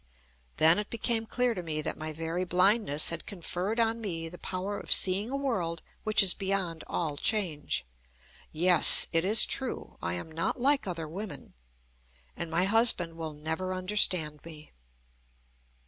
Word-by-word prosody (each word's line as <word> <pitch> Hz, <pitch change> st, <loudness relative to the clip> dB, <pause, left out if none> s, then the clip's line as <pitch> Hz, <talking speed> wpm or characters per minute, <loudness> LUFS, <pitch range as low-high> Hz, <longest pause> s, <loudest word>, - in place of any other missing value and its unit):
Then 165 Hz, +4 st, +4 dB
it 210 Hz, -, -5 dB
became 230 Hz, -1 st, -1 dB
clear 250 Hz, 0 st, 0 dB
to 185 Hz, -, -5 dB
me 155 Hz, -3 st, -4 dB
that -, -, -3 dB
my 155 Hz, 0 st, -6 dB
very 165 Hz, +3 st, -4 dB
blindness 180 Hz, -3 st, +3 dB
had 170 Hz, -, -5 dB
conferred 195 Hz, +3 st, -3 dB
on 230 Hz, 0 st, 0 dB
me 165 Hz, -6 st, -4 dB
the 175 Hz, -, -13 dB
power 190 Hz, +2 st, -5 dB
of -, -, -9 dB
seeing 195 Hz, +4 st, +4 dB
a 275 Hz, -, -3 dB
world 185 Hz, -12 st, -3 dB, 0.2 s
which 215 Hz, -1 st, +3 dB
is 185 Hz, -, +3 dB
beyond 190 Hz, -4 st, -3 dB
all 150 Hz, -4 st, -3 dB
change. 170 Hz, -, -1 dB, 0.7 s
Yes! 175 Hz, +2 st, +7 dB
It 165 Hz, -1 st, +2 dB
is 210 Hz, +4 st, +5 dB
true. 260 Hz, -2 st, -4 dB
I 85 Hz, +1 st, -3 dB
am 160 Hz, -, -7 dB
not 165 Hz, +10 st, -3 dB
like 275 Hz, -1 st, +2 dB
other 165 Hz, -3 st, -5 dB
women. 190 Hz, +5 st, -8 dB, 0.8 s
And 170 Hz, -, -5 dB
my 165 Hz, +2 st, +1 dB
husband 195 Hz, -5 st, +3 dB
will 160 Hz, -2 st, -6 dB
never 160 Hz, +5 st, -4 dB
understand 185 Hz, -5 st, 0 dB
me. 155 Hz, -2 st, -12 dB
180 Hz, 160 wpm, -28 LUFS, 165-210 Hz, 0.8 s, Yes